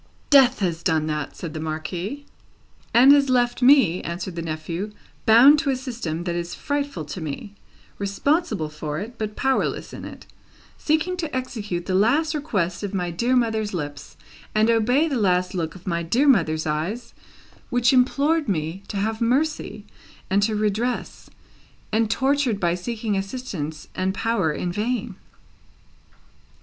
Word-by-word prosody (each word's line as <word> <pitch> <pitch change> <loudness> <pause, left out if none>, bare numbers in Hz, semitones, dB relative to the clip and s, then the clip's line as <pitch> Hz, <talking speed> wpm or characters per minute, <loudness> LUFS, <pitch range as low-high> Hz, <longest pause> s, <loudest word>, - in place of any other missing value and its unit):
"Death 265 -4 +6
has 170 -3 -1
done 160 -4 +1
that!" 150 -1 -3
said 165 -4 -6
the 155 - -5
Marquis. 170 - -4 0.7
"And 255 +4 +7
has 285 -1 +5
left 245 -1 +2
me," 245 - +5
answered 170 +1 -5
the 170 - -3
nephew, 165 +5 -4 0.3
"bound 255 +7 +8
to 300 -2 -1
a 270 - +2
system 230 - -4
that 175 -1 -2
is 170 0 -4
frightful 285 - -3
to 165 +5 -7
me, 160 +7 -6 0.5
responsible 205 - 0
for 150 0 -5
it, 225 +7 -7
but 215 -1 -3
powerless 265 0 -1
in - - -8
it; - - -10 0.5
seeking 315 +4 0
to 320 -6 -4
execute 210 -9 -4
the 185 - -2
last 265 - +3
request 200 - -2
of 205 -1 -4
my 180 -2 -1
dear 240 +9 +1
mother's 220 -4 0
lips, 145 -3 -6 0.4
and 220 +2 +4
obey 245 +7 +3
the 275 -6 -1
last 180 -2 +1
look 170 -3 -3
of 185 - -13
my 170 -3 -1
dear 235 - +1
mother's 160 - +3
eyes, 165 +11 -3 0.6
which 245 +1 +3
implored 280 +3 +2
me 165 +1 -2
to 205 - -5
have 220 +3 -2
mercy 250 -3 0 0.5
and 200 +1 +3
to 215 +1 +1
redress; 215 +4 -2 0.6
and 220 0 +1
tortured 260 -2 +1
by 175 -2 +1
seeking 215 +3 -3
assistance 195 - -5
and 190 +1 -1
power 225 -9 0
in 175 +3 -3
vain." 220 +1 -2
210 Hz, 155 wpm, -23 LUFS, 170-255 Hz, 0.7 s, bound